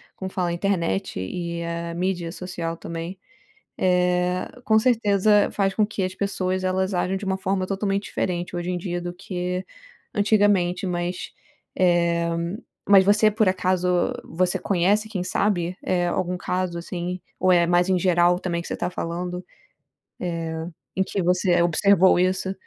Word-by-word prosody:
como 190 0 -6
fala? 180 -2 -1
A - - -1
internet 170 - -1
e 170 - -4
a 170 0 -4
mídia 175 -1 -2
social 170 -2 -5
também. 170 +3 -6 0.6
Eh, 180 0 +1 0.2
com 220 +1 +4
certeza 210 -3 +3
faz 195 -1 0
com 215 - +2
que 205 -2 -3
as 185 0 -2
pessoas 185 -2 -1
elas 190 +1 0
ajam 180 +1 0
de 205 - -9
uma 190 0 0
forma 190 0 -1
totalmente 195 0 -1
diferente 175 0 -3
hoje 175 +1 -3
em 180 - -1
dia 175 0 -3
do 175 0 -5
que 180 -1 -4 0.5
antigamente, 205 -3 +2
mas, 175 0 -3 0.5
eh, 170 -2 +2 0.6
mas 195 -2 +7
você 215 +1 +5
por 215 -1 +2
acaso, 180 -1 +1
você 180 +2 0
conhece 200 +3 +1
quem 190 -5 -3
sabe, 180 -2 0
eh, 175 -1 +1
algum 180 +1 -1
caso, 180 -1 -2
assim? 175 +1 -4 0.2
Ou 185 0 +3
é 175 -1 +5
mais 175 +1 +3
em 185 - +3
geral 175 0 +3
também 170 -2 -2
que - - -9
você - - -3
tá - - -1
falando, 180 +1 -4 1.5
eh, - - +2
em - - +5
que 195 +1 -3
você 180 0 +3
observou 190 +2 +4
isso? 185 +1 +1
180 Hz, 160 wpm, -24 LUFS, 175-190 Hz, 1.5 s, mas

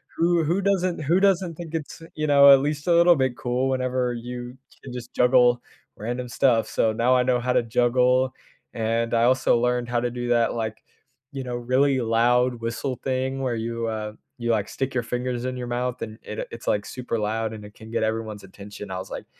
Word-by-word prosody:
who 170 0 +2
who 170 +6 0
doesn't 185 -3 0
who 170 +6 +3
doesn't 190 -3 +2
think 165 -1 -9
it's, 160 0 -6
you 155 -1 -2
know, 140 -1 +8
at 135 - +6
least 150 +1 -2
a 175 - +4
little 170 +1 +6
bit 130 -3 0
cool 125 +2 -1
whenever 130 -1 0
you 120 +1 -7 0.3
can 130 - -8
just 120 -1 -8
juggle 125 -1 +4 0.4
random 120 +3 -4
stuff, 120 -3 +2
so 110 - +1
now 120 +3 +3
I 125 - +3
know 125 -1 +2
how 125 +1 0
to - - +3
juggle, 125 +2 +2 0.4
and 115 +1 -1
I 115 - +3
also 130 -1 +3
learned 125 0 0
how 120 0 +1
to 120 - 0
do 120 0 -4
that, 120 -1 +2
like, 110 -2 -4 0.5
you 135 - -4
know, 125 -1 -4
really 130 +3 +2
loud 120 +1 +2
whistle 115 +3 -3
thing 130 0 -1
where 130 -2 -1
you, 115 +1 -3
uh, 110 -1 -4 0.3
you, 120 0 0
like, 105 -2 0
stick 135 0 -3
your 125 - +1
fingers 125 +1 -3
in 130 0 -3
your 125 -1 -5
mouth 125 +1 -2
and 110 -1 -6
it, 105 - -7
uh, - - -3
it's, 115 - -10
like, 105 0 +1
super 125 -3 -4
loud 110 +1 -1
and 105 -1 -9
it 105 - -13
can 110 0 -12
get 115 - -1
everyone's 110 -2 -3
attention, 100 +1 -10
I 95 - -3
was, 95 - -9
like - - -6
125 Hz, 220 wpm, -24 LUFS, 115-130 Hz, 0.5 s, know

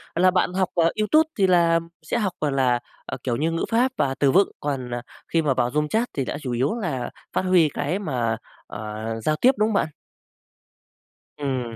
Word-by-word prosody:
là 185 +2 +5
bạn 180 -1 +1
học, 185 -1 +1
à, 170 -2 +4
YouTube 310 +9 +3
thì 190 -1 +4
là 170 -2 +4 0.2
sẽ - - -2
học, 200 -6 0
gọi 150 -2 +1
là, 130 -3 +2 0.3
à, - - -5
kiểu 120 -3 0
như, 160 +5 0
ngữ 165 - -1
pháp 245 +3 +3
và 135 -1 +1
từ 140 -2 +4
vựng, 195 +5 +4
còn, 135 -4 -3
à, 120 - -3 0.3
khi 165 - +2
mà 145 -4 +2
vào 120 0 0
room 150 +1 +1
chat 225 +8 0
thì 135 - -1
đã - - -3
chủ 130 - -4
yếu 130 - 0
là 160 - -3 0.2
phát - - +1
huy 185 -4 +4
cái 150 +9 -2
mà, 120 - -1 0.3
ờ, 110 0 -6 0.2
giao 155 +4 +2
tiếp, 250 +11 +5
đúng 215 +1 +2
không - - -1
bạn? 200 - +2 1.5
Ừm, 130 -5 -3
155 Hz, 215 wpm, -24 LUFS, 130-185 Hz, 1.5 s, là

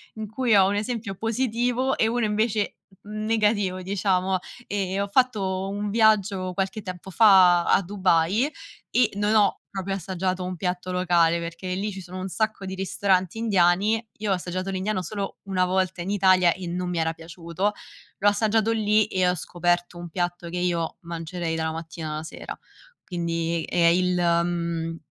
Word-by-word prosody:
in 220 -1 -5
cui 230 0 +2
ho 190 -1 +6
1 200 - 0
esempio 215 -1 -3
positivo 245 +4 0
e 220 - +3
1 235 0 0
invece 215 0 0 0.3
n 215 +1 -5
negativo 210 -4 +1
diciamo. 190 0 0 0.3
Ehm, 195 -1 -1
ho 200 - -1
fatto 200 -5 +1
un 205 +1 -3
viaggio 205 -4 +2
qualche 195 +3 -2
tempo 185 -1 -7
fa 185 -4 +6
a - - +4
Dubai 190 - +2 0.4
e 245 -3 +3
non 205 +1 +1
ho 210 -2 +5 0.2
proprio 195 0 -3
assaggiato 185 0 -2
un 180 0 -4
piatto 180 0 -3
locale, 175 -2 +3
perché 170 +2 -5
lì 205 +3 -2
ci 190 -1 -7
sono 180 +1 -9
un 185 - -4
sacco 215 +1 -2
di 190 - -5
ristoranti 190 0 0
indiani. 205 +1 +2
Io 210 -1 -2
ho - - +5
assaggiato 185 +1 -3
l'Indiano 190 0 -2
solo 200 +2 -5
1 190 -2 0
volta 185 -1 0
in 180 - -4
Italia 185 -3 +4
e 185 - -8
non 180 +1 -3
mi 175 - -2
era 160 0 0
piaciuto. 170 +4 -3 0.4
L'ho 205 - +1
assaggiato 220 +1 +1
lì 215 -1 +3
e 185 -1 +1
ho 180 - +1
scoperto 175 +1 -1
un 175 0 -7
piatto 175 0 -3
che 175 - -4
io 175 -2 -1
mangerei 170 0 -4
dalla 160 0 -1
mattina 160 -1 -6
alla 155 +1 -4
sera. 160 - -8 0.5
Quindi 170 -1 -2
è 170 -1 +2
il 180 +1 +3
mhmm, 170 -1 0
185 Hz, 170 wpm, -25 LUFS, 175-205 Hz, 0.5 s, ho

